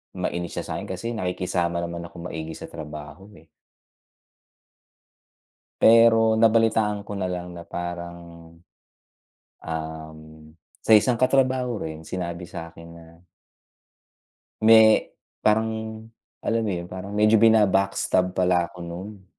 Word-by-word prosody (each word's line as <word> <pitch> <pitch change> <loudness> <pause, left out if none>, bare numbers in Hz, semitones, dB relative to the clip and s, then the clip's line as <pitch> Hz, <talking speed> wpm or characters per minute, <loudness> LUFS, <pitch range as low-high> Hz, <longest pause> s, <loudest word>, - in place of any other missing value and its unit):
mainis 85 0 -4
siya - - -5
sa'kin - - -6
kasi 115 +1 -4
nakikisama 90 -3 -2
naman 85 0 -5
akong 85 +1 -9
maigi 80 -1 -6
sa - - -9
trabaho 75 +3 -9
eh. 80 - -23 2.4
Pero 115 -1 +6
nabalitaan 110 -2 +3
ko 100 - -9
na 95 - -1
lang 90 -1 -5
na 85 0 -10
parang, 85 0 -6 1.5
um, 80 -1 -6 0.7
sa - - +1
isang 115 +3 +5
katrabaho 130 -2 +1
rin 80 0 -7
sinabi 85 -1 -5
sa'kin 85 0 -10
na 85 -1 -14 1.6
may, 110 -1 +6 0.3
parang 110 0 0 0.4
alam 115 0 0
mo 105 - -1
yun, 85 -1 -4
parang 95 +2 -8
medyo 105 +1 +4
bina-backstab 100 -4 +3
pala 90 -1 +2
ako - - -15
nun. 95 +3 -8
95 Hz, 115 wpm, -24 LUFS, 85-110 Hz, 2.4 s, Pero